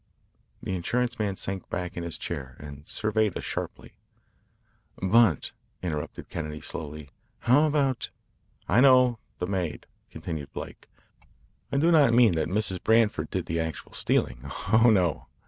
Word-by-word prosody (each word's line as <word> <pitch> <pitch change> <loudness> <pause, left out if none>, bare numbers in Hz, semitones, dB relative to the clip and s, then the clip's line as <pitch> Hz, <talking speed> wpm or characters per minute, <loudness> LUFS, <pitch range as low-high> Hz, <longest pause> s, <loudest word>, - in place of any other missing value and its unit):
The - - -3
insurance 120 +7 -1
man 100 -3 0
sank 95 -1 -3
back 90 0 -4
in 85 - -4
his 85 -1 -4
chair 65 -2 -5
and 70 0 -10
surveyed 110 -2 0
us - - -6
sharply. - - -5 1.1
"But," 95 - +3 0.3
interrupted 75 -4 -4
Kennedy 75 -2 -5
slowly, 75 -2 -6 0.3
"how 135 +6 +5
about 140 -4 0 0.3
" - - -39
"I 120 - +4
know 125 -3 +6 0.2
the 90 - -2
maid," 90 -5 -3 0.2
continued 80 -5 -6
Blake. - - -8 0.8
"I - - 0
do 165 +5 +4
not 140 -8 +5
mean 120 -6 +6
that 80 - 0
Mrs. 95 0 0
Branford 110 -1 +3
did - - -2
the 80 +1 -2
actual 80 -1 -4
stealing. - - 0 0.3
Oh, 115 +2 +7
no. 90 -8 +1
95 Hz, 145 wpm, -27 LUFS, 80-120 Hz, 1.1 s, Oh